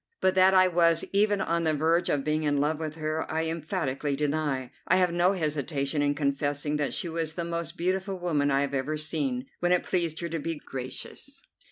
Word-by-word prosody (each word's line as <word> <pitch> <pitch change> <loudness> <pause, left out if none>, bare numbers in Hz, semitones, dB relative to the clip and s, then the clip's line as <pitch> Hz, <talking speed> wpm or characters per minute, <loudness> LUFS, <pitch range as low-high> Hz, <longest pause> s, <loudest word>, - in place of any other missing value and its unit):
But 185 - +3
that 190 0 +5
I 185 0 +7
was 170 -2 +3
even 205 0 +3
on 170 0 0
the 160 -2 +1
verge 165 +4 +2
of 140 -2 +1
being 155 +1 0
in 145 -2 +1
love 150 +2 +1
with 155 -1 -4
her 155 0 -3
I 160 +1 0
emphatically 155 -4 -2
deny. 145 -3 -1 0.2
I 175 - +5
have 180 -2 +3
no 175 +2 +3
hesitation 150 -3 -1
in 145 0 +1
confessing 145 +1 0
that 145 -1 -1
she - - -1
was 160 -1 -2
the 170 - -2
most 170 0 -4
beautiful 190 +2 -1
woman 155 -5 +1
I 135 0 +2
have 140 0 -2
ever 140 +3 -1
seen, 145 -5 -1
when 175 0 +1
it 180 - +3
pleased 170 -3 0
her 170 - -3
to 165 0 -2
be 165 +2 -3
gracious. 130 -3 -5
155 Hz, 210 wpm, -28 LUFS, 145-170 Hz, 0.2 s, I